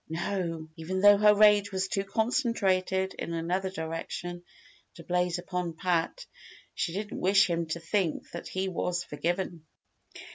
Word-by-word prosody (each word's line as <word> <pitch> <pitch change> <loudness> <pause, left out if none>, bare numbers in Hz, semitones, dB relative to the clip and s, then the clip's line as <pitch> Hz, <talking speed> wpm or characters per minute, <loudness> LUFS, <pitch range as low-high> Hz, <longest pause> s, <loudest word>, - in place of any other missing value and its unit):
No! 165 -1 -3
even 185 +4 -3
though 205 0 +7
her 210 0 +6
rage 205 -1 +5
was 190 0 -1
too 195 0 -1
concentrated 195 -4 0
in 170 - -4
another 180 +3 -1
direction 175 +1 -5 0.5
to 170 - -11
blaze 180 0 0
upon 175 -1 -3
Pat, 180 - -1 0.5
she 170 - -2
didn't 205 +4 -4
wish 195 +2 +4
him 170 -2 -1
to 155 +2 -3
think 165 0 -1
that 170 - -7
he 190 +1 -2
was 180 -1 -2
forgiven. 170 +2 -3
185 Hz, 145 wpm, -29 LUFS, 170-195 Hz, 0.5 s, though